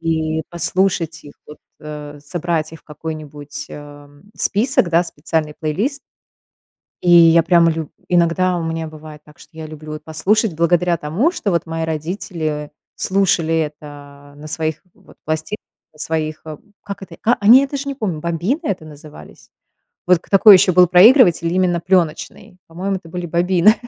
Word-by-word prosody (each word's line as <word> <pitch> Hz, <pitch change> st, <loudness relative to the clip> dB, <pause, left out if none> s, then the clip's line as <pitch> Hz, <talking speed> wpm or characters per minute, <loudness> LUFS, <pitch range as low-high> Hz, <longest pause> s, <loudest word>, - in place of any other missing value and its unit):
и 160 Hz, -1 st, -1 dB
послушать 170 Hz, -2 st, -1 dB
их 145 Hz, -, -13 dB
вот, 150 Hz, -, -12 dB, 0.2 s
а, 150 Hz, -1 st, -9 dB
собрать 165 Hz, +1 st, -3 dB
их 160 Hz, -, -10 dB
в -, -, -43 dB
какой-нибудь, 150 Hz, -1 st, -8 dB
а, 145 Hz, -1 st, -11 dB, 0.3 s
список, 215 Hz, -2 st, +1 dB
да, 170 Hz, +1 st, +3 dB
специальный 155 Hz, -2 st, -3 dB
плейлист. 205 Hz, -, -2 dB, 1.0 s
И 175 Hz, -, +1 dB
я 165 Hz, -1 st, +7 dB
прямо 170 Hz, -1 st, +4 dB
лю 160 Hz, -2 st, -4 dB, 0.2 s
иногда 175 Hz, +1 st, +1 dB
у 170 Hz, -, -3 dB
меня 165 Hz, 0 st, -3 dB
бывает 155 Hz, -1 st, -12 dB
так, 150 Hz, -1 st, -19 dB
что 160 Hz, -, -18 dB
я 160 Hz, -1 st, -7 dB
люблю 155 Hz, 0 st, -10 dB
вот 155 Hz, 0 st, -8 dB
послушать 190 Hz, +6 st, 0 dB
благодаря 175 Hz, +1 st, +2 dB
тому, 170 Hz, -, 0 dB
что 205 Hz, -, -3 dB
вот 170 Hz, -1 st, 0 dB
мои 165 Hz, 0 st, -4 dB
родители 160 Hz, -2 st, -4 dB, 0.2 s
слушали 185 Hz, -4 st, +1 dB
это 145 Hz, -2 st, -8 dB
на 150 Hz, -, -10 dB
своих 155 Hz, 0 st, -3 dB
вот -, -, -21 dB
пласти 155 Hz, +6 st, -3 dB, 0.4 s
на 155 Hz, -, -22 dB
своих, 155 Hz, -1 st, -2 dB, 0.4 s
как 200 Hz, -1 st, -8 dB
это,- -, -, -12 dB
а, 240 Hz, -, +3 dB
они, 230 Hz, +6 st, +8 dB
я 275 Hz, -, -1 dB
даже 280 Hz, 0 st, -5 dB
не -, -, -3 dB
помню,- 200 Hz, -, -3 dB
бобины 170 Hz, -, -2 dB
это 185 Hz, -, -3 dB
назывались? 150 Hz, -, -14 dB, 0.6 s
Вот 180 Hz, -1 st, +4 dB
к -, -, -25 dB
такой 200 Hz, +1 st, +8 dB
еще 185 Hz, 0 st, +4 dB
был 180 Hz, +1 st, +6 dB
проигрыватель 180 Hz, -, +5 dB
именно 180 Hz, -2 st, +1 dB
пленочный. 180 Hz, 0 st, -1 dB
По-моему, 190 Hz, +4 st, -3 dB
это 170 Hz, -3 st, -14 dB
были 175 Hz, +1 st, -5 dB
бобины. 175 Hz, +4 st, +3 dB
165 Hz, 165 wpm, -18 LUFS, 155-185 Hz, 1.0 s, они